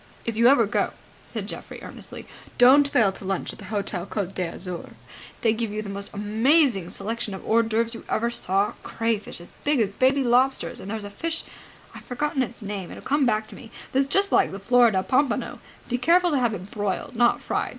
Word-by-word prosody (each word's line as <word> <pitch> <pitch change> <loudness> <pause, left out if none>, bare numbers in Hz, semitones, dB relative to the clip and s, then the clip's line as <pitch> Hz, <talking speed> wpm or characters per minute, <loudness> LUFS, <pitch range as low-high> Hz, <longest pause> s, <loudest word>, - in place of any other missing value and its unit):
"If 230 - -2
you 235 +2 +5
ever 255 -3 +6
go," 205 - 0 0.3
said - - -4
Geoffrey, - - -7
earnestly, - - -9 0.3
"don't 270 +4 +7
fail 220 -8 +3
to 195 - -8
lunch 190 -1 -2
at - - -14
the 200 - -9
Hotel 195 -3 -3
Côte 195 -3 -3
d'Azur. 180 0 -5 0.5
They 225 -2 +3
give 225 0 -2
you 215 +1 -3
the 200 - -6
most 200 +1 -5
amazing 220 - +2
selection 225 0 -3
of 190 - -10
hors 230 +1 +4
d'oeuvres 230 +1 0
you 230 - -8
ever 235 +2 0
saw. 200 -2 0
Crayfish 225 -4 -2
as 175 - -14
big 290 -2 +2
as 215 -4 +2
baby 260 +6 +2
lobsters! 255 +2 +2
And 190 - -8
there's 220 0 -4
a 205 - -8
fish 330 +10 -4 0.5
I've - - -11
forgotten 275 +2 -1
it's 240 -2 -4
name, 200 -3 -5
it'll - - -10
come 285 -1 +2
back 215 -1 0
to - - -9
me 225 - -12 0.2
that's 270 +1 +2
just 395 +7 +2
like - - +4
the 195 - -5
Florida 225 -2 +4
pompano. 270 +4 0 0.3
Be 245 0 -1
careful 350 +6 +4
to 285 - +2
have 235 -4 +1
it 185 +1 -9
broiled, 205 +2 -3
not 240 +1 +3
fried. - - -2
225 Hz, 210 wpm, -25 LUFS, 200-255 Hz, 0.5 s, don't